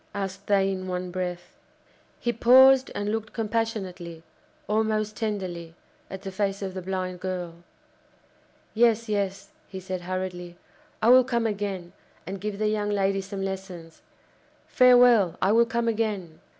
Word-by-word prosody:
asked 195 0 -5
they 195 -1 +3
in 185 -1 -5
one 180 0 -4
breath. 180 -1 -5 0.7
He 240 - -1
paused 260 +3 +6
and 205 +1 -2
looked 220 0 -4
compassionately, 210 -7 -3 0.4
almost 215 0 0
tenderly, 185 -7 -4 0.3
at 190 0 -8
the 195 - -5
face 195 +1 -2
of 190 -1 -4
the 185 - -5
blind 185 -1 -4
girl. 180 -2 -5 1.2
"Yes, 230 0 +3
yes," 200 +4 -2 0.2
he 190 - -8
said 185 -1 -5
hurriedly, 180 -1 -5 0.5
"I 225 - +5
will 255 +1 +8
come 235 -2 -1
again, 200 -5 -3 0.3
and 190 +2 -6
give 210 -1 -4
the 215 +1 0
young 210 -1 -1
lady 195 -1 0
some 195 0 -6
lessons! 185 -4 -7 0.6
Farewell! 245 -7 +5
I 190 - +2
will 230 +1 +4
come 235 0 -1
again!" 210 -8 -2
195 Hz, 145 wpm, -26 LUFS, 185-220 Hz, 1.2 s, will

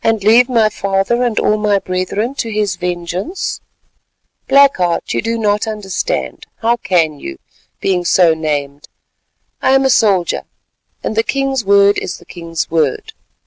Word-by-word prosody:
"And 225 -3 +1
leave 235 +4 +5
my 225 -3 +3
father 195 +4 -1
and 240 -3 0
all 215 - +2
my 210 -1 +2
brethren 195 +6 -2
to 235 -4 -4
his 210 -3 -1
vengeance? 180 - -4 0.9
Black 280 0 +5
Heart, 175 -2 -1
you - - 0
do 230 +1 -2
not 210 0 0
understand. 215 - -3
How 235 +1 +1
can 165 -8 0
you, 70 - -7 0.4
being 185 -2 0
so 175 -1 +4
named? 145 -2 -3 0.7
I 265 - +3
am 270 0 +3
a 265 - +3
soldier, 195 -7 +2 0.6
and - - -3
the 225 - +3
king's 270 +1 -1
word 200 0 +4
is 185 - -5
the - - -18
king's 165 -3 -5
word. 155 -5 -1
200 Hz, 155 wpm, -16 LUFS, 175-230 Hz, 0.9 s, leave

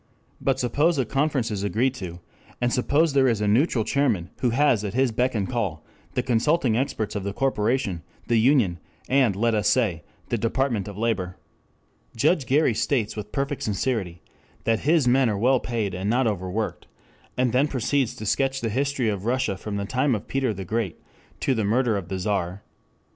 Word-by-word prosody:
But 135 -1 +1
suppose 145 +6 +2
a 130 - +1
conference 135 -2 0
is 100 -2 -2
agreed 115 +7 +1
to, 90 -8 -7 0.4
and 120 -1 +1
suppose 145 +5 +2
there 135 -1 +4
is 115 -4 +1
a 105 - 0
neutral 115 +2 +3
chairman 110 -11 0
who 125 - +2
has 120 -3 +3
at 100 0 -4
his 130 -1 +2
beck 125 +3 0
and 100 -3 0
call 100 -11 -3 0.3
the 125 - +1
consulting 125 +1 +2
experts 110 -4 -2
of 100 - -2
the 100 0 -3
corporation, 115 -6 0 0.3
the 115 -1 +3
union, 115 -8 +3 0.3
and, 130 -7 +3
let 115 +3 +1
us 105 -1 +1
say, 105 -11 +1 0.3
the 120 - 0
Department 115 -2 0
of 100 -1 -8
Labor. 100 -5 -1 0.8
Judge 145 +3 +2
Gary 145 -2 +3
states 115 0 0
with 105 -1 -6
perfect 140 0 -2
sincerity 100 -5 -2 0.4
that 115 -1 +1
his 155 -3 +2
men 130 0 +4
are 105 - -1
well 125 +5 +3
paid 115 -6 -2
and 95 +3 -2
not 125 +3 +2
overworked, 105 0 -2 0.5
and 125 -2 +1
then 135 +4 +3
proceeds 135 -1 0
to 110 - -7
sketch 135 +5 +1
the 115 - -1
history 135 +1 0
of 100 -2 -2
Russia 125 -4 0
from 100 +2 -6
the 100 - -2
time 130 +3 +1
of 105 - -6
Peter 135 -3 0
the 95 -2 -6
Great 110 -3 -2 0.4
to 135 - +2
the 110 -3 0
murder 115 +2 +2
of 95 -4 -4
the 95 - -2
Czar. 95 -1 -2
Mr. - - -40
115 Hz, 195 wpm, -24 LUFS, 105-130 Hz, 0.8 s, there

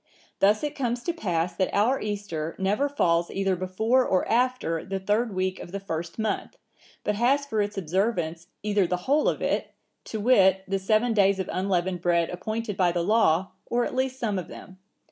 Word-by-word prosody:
Thus 205 +5 +3
it 295 0 -2
comes 240 -4 -2
to 345 - -1
pass 175 - -1
that 190 - 0
our 230 +7 +2
Easter 200 -7 -4
never 205 +9 +1
falls 170 -11 +1
either 195 -1 0
before 220 +8 +1
or 185 -6 +1
after 240 -9 +1
the 195 0 -3
third 210 +4 0
week 185 0 -1
of - - -9
the 200 - -4
first 170 -3 -5
month, 220 -2 -2 0.5
but 210 - 0
has 260 +7 +2
for 220 -6 0
its 205 0 -3
observance 175 -2 -1 0.2
either 205 -3 +2
the 180 - 0
whole 290 +3 +3
of - - -3
it, - - -1 0.3
to 220 - -5
wit, 190 -5 +4
the 195 0 0
seven 215 +5 +2
days 200 -2 +4
of 190 -1 -3
unleavened 185 -1 0
bread 170 -1 +2
appointed 215 +3 -4
by 180 -2 +3
the 170 0 -1
law, 190 -3 +3 0.2
or 240 0 +1
at - - -4
least 260 0 -1
some 210 -6 -1
of 175 - -7
them. 185 0 -12
195 Hz, 195 wpm, -26 LUFS, 180-230 Hz, 0.5 s, wit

